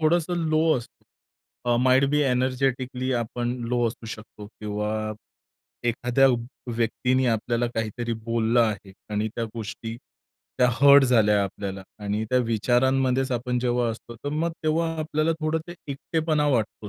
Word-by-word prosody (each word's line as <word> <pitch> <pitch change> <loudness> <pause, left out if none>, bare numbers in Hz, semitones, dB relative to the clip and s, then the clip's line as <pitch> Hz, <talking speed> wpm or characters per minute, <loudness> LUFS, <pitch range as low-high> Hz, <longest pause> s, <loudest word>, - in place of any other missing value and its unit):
थोडंसं 170 +2 +2 0.2
लो 155 0 +3
असतो, 120 - -10 0.7
अ, 120 - +4
might 130 +1 +5
be 150 0 +2
energetically 130 0 0
आपण 120 0 -2
लो 120 -1 +2
असू 115 0 -9
शकतो 110 -1 -9
किंवा 105 0 -3 0.8
एखाद्या 120 +3 +3
व 125 - +3 0.4
व्यक्तीने 125 +3 +1
आपल्याला 120 +1 0
काहीतरी 115 +1 -2
बोललं 115 +1 +2
आहे 105 -3 -1 0.2
आणि 105 +1 0
त्या 115 - -1
गोष्टी, 115 0 -6 0.6
त्या 125 - +5
हर्ट 140 +2 +7
झाल्या 105 -5 +4
आपल्याला 95 0 -5 0.2
आणि 105 +1 -1
त्या 125 - +4
विचारांमध्येच 125 +3 +2
आपण 125 +1 -1
जेव्हा 120 -1 +1
असतो, 115 +1 -9
तर 145 - -6
मग 165 +2 0
तेव्हा 160 +1 +1
आपल्याला 155 +1 0
थोडं 155 +1 0
ते 175 - -8
एकटेपणा 155 +2 0
वाटतो. 110 -4 -1
120 Hz, 140 wpm, -25 LUFS, 115-135 Hz, 0.8 s, हर्ट